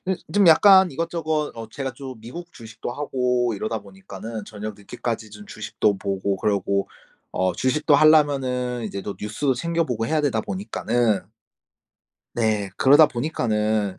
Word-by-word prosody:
그 190 0 -1 0.2
좀 205 -1 +4
약간 190 +2 +7
이것저것 160 0 -2
어 115 -1 -8
제가 135 +2 -5
좀 130 -2 -9
미국 170 +10 -9
주식도 110 +1 -8
하고 125 -3 0
이러다 110 +2 -3
보니까는 100 +2 -9
저녁 105 0 -7
늦게까지 110 +1 -5
좀 105 0 -12
주식도 105 -2 -1
보고 100 0 -2
그러고 100 0 0 0.4
어 95 0 0
주식도 145 - +2
하려면은 135 -5 +3
이제 100 -2 -5
또 100 - -5
뉴스도 125 +6 -1
챙겨보고 135 -6 -1
해야 155 +2 +1
되다 130 -7 0
보니까는 110 +3 -1 1.1
네. 110 -4 0
그러다 145 +3 +7
보니까는 110 - -1
120 Hz, 320 characters per minute, -23 LUFS, 105-145 Hz, 1.1 s, 약간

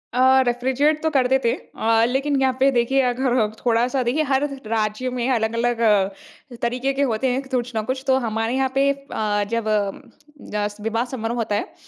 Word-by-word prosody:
अ, 260 +1 +5
refrigerate 265 +5 +1
तो 320 - +2
करते 265 -3 +3
थे। 230 - +3
अ, 225 0 0
लेकिन 275 +3 0
यहाँ 265 -1 +2
पे 270 +1 +5
देखिए 255 +2 +2
अगर 245 -3 +1 0.2
थोड़ा-सा 245 +3 +2
देखिए 255 +6 +1
हर 270 +2 +2 0.3
राज्य 215 +3 -1
में 250 0 -2
अलग-अलग 230 +1 0
अ, 230 +6 -1
तरीके 250 +3 -1
के 275 - -2
होते 220 +4 0
हैं 255 +1 0
कुछ 250 -1 -1
न 220 - 0
कुछ। 260 +4 -3
तो 265 0 +4
हमारे 225 +2 -1
यहाँ 265 0 +1
पे 275 +1 +3
अ, 215 -7 -2
जब 230 -1 -1
अ, 215 +6 -4
अस 205 0 -4
विवाह 225 +2 -1
समारोह 230 0 -3
होता 215 -3 -1
है - - -3
245 Hz, 185 wpm, -22 LUFS, 225-265 Hz, 0.3 s, अ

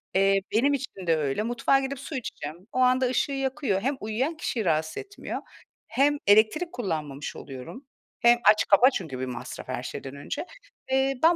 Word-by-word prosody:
Eee, 195 +1 +4
benim 265 +7 +3
için 225 -10 -5
de 165 - +4
öyle. 145 +6 -1
Mutfağa 240 +4 +2
gidip 270 0 -4
su 280 +2 -7
içeceğim, 165 - -5
o - - -2
anda 255 +1 +4
ışığı 260 +3 0
yakıyor. 265 -7 -1
Hem 275 +4 0
uyuyan 250 +10 -2
kişiyi 235 -8 -2
rahatsız 155 -1 0
etmiyor 405 0 -6 0.5
hem 290 +2 +2
elektrik 220 - +4
kullanmamış 155 - -4
oluyorum. 135 - -9 0.3
Hem 240 0 +5
aç 215 - +5
kapa 240 +6 +7
çünkü 155 - -4
bir 130 - -2
masraf 125 -2 -7
her - - -4
şeyden 135 +1 -6
önce. 140 - -5 0.5
Eee, 265 +1 +3
ben 335 +1 +6
235 Hz, 175 wpm, -26 LUFS, 170-270 Hz, 0.5 s, kapa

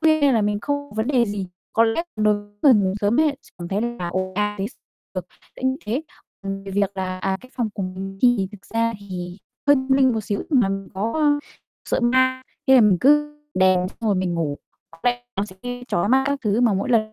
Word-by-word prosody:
khuya 315 -1 +4
nên 280 -3 +4
là 220 - +3
mình 205 0 0
không 285 +1 -3
vấn 220 +2 -1
đề 250 -4 +3
gì, 205 -2 -3 0.3
có 230 - +4
lẽ 225 +9 +1
đối 215 -1 +3
với 205 - -6 0.2
người 275 -5 +7
ngủ 195 -2 +2
sớm 210 +8 +3
ấy, 300 -3 +2
sẽ - - -20
cảm 175 0 -6
thấy 200 +2 -1
là 235 -7 -3
ồn 185 +1 -2
ào 210 0 0
t - - -2 0.5
được, - - -4 0.3
kiểu 260 0 +1
như 260 - -3
thế. 250 +8 -1 0.4
Ừm, 195 0 -5
về 195 - -7
việc 200 0 0
là 185 -1 -3
à, 190 0 -1
cái 255 - -16
phòng 235 -3 0
của 200 - -3
mình 190 +1 -6
thì 245 -7 +4
thực 200 - -13
ra 230 0 +2
thì 180 -2 -6 0.3
hơi 285 0 +7
tâm 260 0 0
linh 265 -2 +5
một 220 - -1
xíu 205 - -2
là 245 -9 +4
mình 195 0 -4
có, 210 +4 -1
a, 290 -1 +4 0.5
sợ - - +2
ma, 260 +1 +3 0.2
thế 265 - +7
là 255 - +8
mình 200 -5 +5
cứ 295 +3 +3 0.2
đèn 185 -1 +3
xong - - -19
rồi 215 -3 +1
mình 185 -2 0
ngủ, 150 -4 -2 0.3
bật 165 - -16
đèn 245 0 +1
nó 195 - 0
sẽ 190 -2 -13
gây 245 0 -5
chói 175 +4 +1
mắt 265 +2 +4
các 280 -1 0
thứ 210 +2 +2
mà 230 -5 +4
mỗi 195 +6 -1
lần 215 -2 +2
215 Hz, 250 wpm, -22 LUFS, 195-260 Hz, 0.5 s, là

